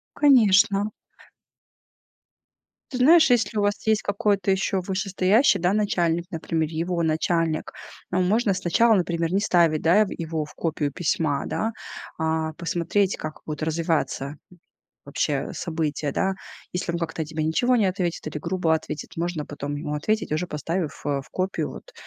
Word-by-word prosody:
Конечно. 215 -6 +5 2.0
Ты 255 - -4
знаешь, 315 +4 +6
если 225 -3 +2
у 205 - +2
вас 205 +1 -1
есть 220 -1 +3
какой-то 200 -2 0
ещё 190 0 +1
вышестоящий, 190 +3 +2
да, 180 +2 +2
начальник, 175 -5 +1
например, 160 -2 -2
его 170 +2 -1
начальник, 160 0 0 0.4
а, 185 - 0
можно 205 +2 +2
сначала, 195 +6 +3
например, 170 -3 0
не 195 - +2
ставить, 170 -6 +3
да, 175 +6 +5
ев 215 - +3
его 160 -2 -3
в - - -15
копию 150 -3 -2
письма, 155 -2 -1
да, 225 +1 -2 0.5
а 160 -1 -1
посмотреть, 175 +4 0
как 155 0 -6
будут 155 0 -5
развиваться 160 -3 -1 0.7
вообще - - -2
события, 155 -4 -2
да. 190 0 0 0.4
Если 180 -1 -2
он 170 - -2
как-то 160 -1 -3
тебе 155 0 -3
ничего 245 +11 +2
не 215 - +3
ответит 180 -4 -2
или 155 - -5
грубо 170 0 0
ответит, 155 -1 -5
можно 165 -2 -2
потом 145 0 -5
ему 150 0 -4
ответить, 215 +4 -1
уже 175 +3 0
поставив, 165 +1 -3
э, 140 -1 0
в - - -21
копию 185 +1 -2
вот, - - -12
175 Hz, 150 wpm, -24 LUFS, 160-200 Hz, 2.0 s, знаешь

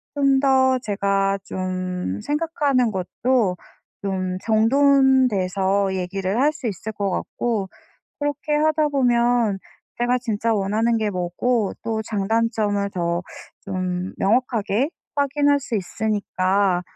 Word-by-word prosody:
좀 275 -1 +3
더 260 -1 +4
제가 200 -3 0
좀 185 - -3
생각하는 290 -6 0
것도 200 +2 0 0.5
좀 185 -2 -2
정돈돼서 220 -6 +3
얘기를 190 +4 -2
할 295 +2 +4
수 280 -5 -6
있을 210 +1 -4
것 200 -2 -2
같고 210 0 -2 0.5
그렇게 290 +1 -1
하다 310 0 +2
보면 240 -6 +2 0.4
제가 245 +1 +2
진짜 225 -1 -1
원하는 215 +3 +1
게 215 -1 0
뭐고 195 +4 -1
또 225 -1 -1
장단점을 210 -1 0
더 170 -1 -1 0.4
좀 185 -1 -3
명확하게 230 +2 +1 0.3
확인할 285 0 +2
수 255 -4 -4
있으니까 200 -2 0
220 Hz, 220 characters per minute, -22 LUFS, 195-260 Hz, 0.5 s, 더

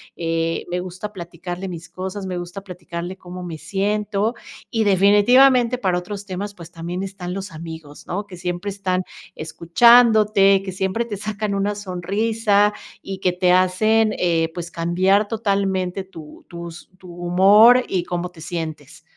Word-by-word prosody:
eh, 165 0 -2
me 180 +1 -1
gusta 185 +3 -6
platicarle 175 +1 -7
mis 170 -2 -8
cosas, 190 +2 -6
me 185 -1 -4
gusta 175 +3 -6
platicarle 180 -1 -7
cómo 180 0 -9
me 170 -3 -6
siento. 205 +6 -1 0.3
Y, 225 -1 0
definitivamente, 230 +6 +5
para 185 -6 0
otros 200 +3 -6
temas, 200 +1 -5
pues, 170 -2 -12
también 175 +3 -5
están 185 -2 -6
los 195 0 -6
amigos, 160 -2 -10
¿no? 200 +3 -4
Que 180 - -10
siempre 175 +3 -4
están 185 -2 -1 0.3
escuchándote, 210 +3 +4
que 190 - -5
siempre 190 +5 -1
te 210 -4 -5
sacan 210 0 -3
una 200 +1 -1
sonrisa, 205 +2 +1 0.3
y 195 -1 -6
que 185 -1 +1
te 180 0 +2
hacen, 215 +4 +3
eh, 165 -2 +1
pues, 170 -1 -6
cambiar 185 +5 +2
totalmente 195 -4 -1
tu 160 -5 -13
tus 170 0 -9
tu 180 -2 -12
humor 195 +8 +6
y 180 -2 -1
cómo 175 0 -3
te 165 - -15
sientes. 160 -3 -6
185 Hz, 155 wpm, -21 LUFS, 175-205 Hz, 0.3 s, humor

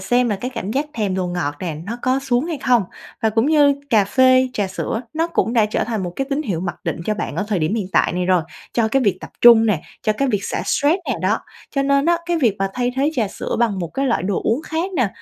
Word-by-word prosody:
xem 245 +6 +2
là 205 - 0
cái 250 +6 -5
cảm 195 - -4
giác 280 +6 -1
thèm 205 -4 -1
đồ 185 -1 -1
ngọt 175 -5 -2
nè, 170 -4 -3
nó 235 +3 -4
có 255 +1 +2
xuống 260 -1 0
hay 325 -4 -3
không. 250 -4 +3 0.4
Và 220 - +3
cũng 225 +4 +1
như 290 -2 +5 0.2
cà 215 -4 +5
phê, 255 +4 +4
trà 205 -5 -1
sữa, 190 +4 -3
nó 325 +1 +1
cũng 285 -8 0
đã 225 -3 +3
trở 215 - -1
thành 220 -4 -3
một 175 -1 -4
cái 270 - 0
tín 280 +2 0
hiệu 185 - -2
mặc 175 -1 -3
định - - -2
cho 215 - +1
bạn 210 - -4
ở 210 - 0
thời 205 - 0
điểm 160 +6 0
hiện 205 -5 -2
tại - - +3
này 180 0 -1
rồi, 180 -2 +3 0.3
cho 230 -2 +1
cái 270 +4 +2
việc 200 -6 +1
tập - - -9
trung 230 -2 +8
nè, 200 -8 +1 0.2
cho 215 - +2
cái 275 +5 -1
việc 205 -5 -1
xả - - -2
stress 295 +5 +2
nè - - +1
đó. - - +2 0.3
Cho 275 - 0
nên 280 +1 +2
á, 345 0 +4
cái 345 -1 +1
việc 230 -9 +2
mà 195 0 0
thay 245 0 -1
thế 285 +3 +2
trà 225 -7 0
sữa - - -4
bằng 225 -5 +1
một 170 -2 -3
cái 275 0 0
loại 240 - +1
đồ 190 0 -1
uống 245 +8 +1
khác 330 +5 -3
nè, 250 -6 +2
230 Hz, 285 wpm, -20 LUFS, 195-270 Hz, 0.4 s, trung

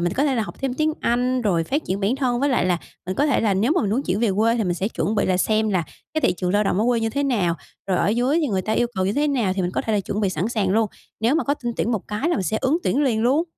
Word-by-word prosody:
mình 175 +1 0
có 280 - +1
thể 275 -3 +1
là 225 - +1
học 210 - -7
thêm 265 -2 -1
tiếng 310 +1 +1
Anh 250 +1 +1
rồi 175 -7 +1
phát 285 - -1
triển 190 +2 -2
bản 210 +6 +1
thân. 250 -3 0
Với 285 - +2
lại 250 - +2
là 180 -2 +1 0.3
mình 185 - -2
có 290 - +2
thể 290 - +2
là 210 -3 +2
nếu 225 +10 +2
mà 360 - +2
mình 200 - -1
muốn 245 +6 +1
chuyển 200 -3 -1
về 230 - +2
quê, 230 +2 +3
thì 225 - 0
mình 175 -2 0
sẽ 190 +3 -1
chuẩn 220 -1 -2
bị 205 - +1
là 185 -1 +2
xem 215 +3 +1
là 180 -3 +1 0.3
cái 315 - +1
thị - - +3
trường 180 0 -1
lao 205 +1 +2
động 195 - +1
ở 215 - +2
quê 240 -2 +2
như 225 0 0
thế 280 +3 -1
nào, 205 -11 +1 0.3
rồi 185 -2 +1
ở - - +2
dưới 245 +8 +2
thì 305 - +1
người 190 -3 0
ta 215 - -2
yêu 240 +2 +2
cầu 190 0 0
như 200 - +1
thế 295 +4 +1
nào 240 -9 +1
thì 190 -1 -2
mình 175 - -1
có - - -1
thể 220 - -2
là 210 - +2
chuẩn 200 +2 -3
bị 200 - +1
sẵn 180 +5 -1
sàng 210 -5 0
luôn. 220 +2 +3 0.3
Nếu 235 +6 +2
mà 330 - +1
có 285 - +1
tin 240 -4 -4
tuyển - - 0
một 215 - -3
cái 210 +10 -1
là 345 - +1
mình 195 - -1
sẽ 185 +5 -1
ứng 285 +6 +2
tuyển 285 - +2
liền 235 -6 +1
luôn. 280 +8 +3
220 Hz, 355 wpm, -22 LUFS, 195-260 Hz, 0.3 s, quê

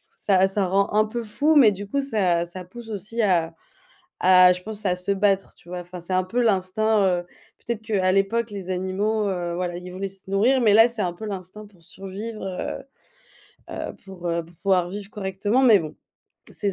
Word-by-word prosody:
ça 190 -2 +3
ça 195 0 0
rend 195 +2 +1
un 215 +1 +4
peu 235 +2 -4
fou, 290 +8 +1
mais 255 -8 +7
du 200 +1 -7
coup, 280 +7 -1
ça 190 -10 +1
ça 180 +2 -8
pousse 225 +5 -11
aussi 215 +3 -3
à 170 -5 +2 0.7
à 185 0 +7
je 180 0 -6
pense, 215 +1 -6
à 180 - +2
se 180 +2 -3
battre, 195 0 +1
tu - - -20
vois? 180 0 -5
Enfin, 175 +1 -9
c'est 175 +2 -6
un 185 0 +3
peu 230 +7 -1
l'instinct. 215 0 +2
Heu, 180 -2 +1 0.4
peut-être 230 -2 -3
qu'à 195 -4 +1
l'époque, 210 +4 +1
les 190 -2 -6
animaux, 200 +4 -1
heu, 175 -2 -2
voilà, 175 -1 -3
ils 180 +1 -8
voulaient 190 +2 -4
se 190 0 -11
nourrir, 235 +7 +3
mais 220 -4 +4
là, 225 +2 +8
c'est 230 -3 -4
un 180 -2 -1
peu 175 +5 -10
l'instinct 200 +1 -7
pour 190 -5 -22
survivre, 195 +6 -7
heu 190 +7 -4 0.9
heu, - - -5
pour, 190 -2 -9
heu, 170 0 -1
pour 170 +2 -19
pouvoir 185 -1 +1
vivre 200 +1 -7
correctement. 205 +5 -1
Mais 230 -6 +7
bon, 155 -4 -6 0.6
c'est 200 -1 -2
195 Hz, 210 wpm, -24 LUFS, 180-215 Hz, 0.9 s, là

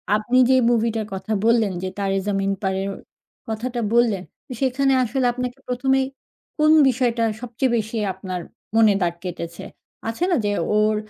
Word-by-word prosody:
আপনি 230 +4 +1
যে 260 - +6
মুভিটার 225 -2 +1
কথা 190 +3 -5
বললেন 230 -4 +3
যে, - - -1
'তারে 195 -1 0
জামিন 195 -1 0
পার' 190 -1 -1
এর 195 - -3 0.6
কথাটা 240 +2 -3
বললেন। 225 -6 +3 0.2
ত - - -59
সেখানে 270 +1 +2
আসলে 255 +2 -1
আপনাকে 250 +1 -4
১ম 255 +2 -1
এই 265 - -1 0.5
কোন 305 0 +4 0.2
বিষয়টা 240 -2 +1 0.2
সবচেয়ে 245 +1 -1
বেশি 220 +1 -3 0.2
আপনার 185 -1 -5 0.3
মনে 220 -2 +6
দাগ 170 -1 +1
কেটেছে? 170 -2 -6 0.4
আছে 230 +10 -2
না? - - +4
যে - - +1 0.3
ওর 215 0 +3
225 Hz, 160 wpm, -22 LUFS, 200-250 Hz, 0.6 s, যে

